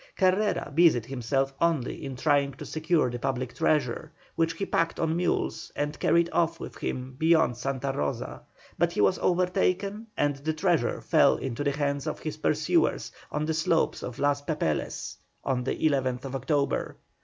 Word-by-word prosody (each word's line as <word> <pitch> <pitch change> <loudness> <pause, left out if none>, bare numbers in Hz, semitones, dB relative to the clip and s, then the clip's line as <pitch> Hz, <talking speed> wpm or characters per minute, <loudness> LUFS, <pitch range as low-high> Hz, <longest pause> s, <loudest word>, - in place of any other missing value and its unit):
Carrera 190 -4 +1
busied 155 -8 +4
himself 135 +2 -1
only 165 -7 0
in 135 -2 -5
trying 140 0 +2
to 130 - -9
secure 155 -4 +1
the 120 - -4
public 130 -1 -2
treasure, 135 -6 0 0.2
which 165 0 +1
he 195 +4 -3
packed 165 -3 0
on 160 0 +1
mules 175 +1 -1
and 150 +1 -2
carried 170 0 +3
off 165 0 +1
with - - -7
him 130 +1 -4
beyond 160 -5 +4
Santa 135 +2 -2
Rosa, 75 - -3 0.4
but - - +3
he - - -4
was 100 -2 +3
overtaken 190 +4 0
and 145 -1 +1
the 155 +3 -2
treasure 155 -6 +1
fell - - +4
into 130 +1 -3
the 140 -1 +1
hands 140 -2 -1
of - - -2
his - - -5
pursuers - - +1 0.2
on 150 +1 -1
the 160 - 0
slopes 160 +1 +1
of 120 - -6
Los 145 0 +1
Papeles 145 - -2 0.3
on 130 -2 0
the - - 0
11th 135 -3 0
October. 140 +2 -1
145 Hz, 165 wpm, -27 LUFS, 130-165 Hz, 0.4 s, busied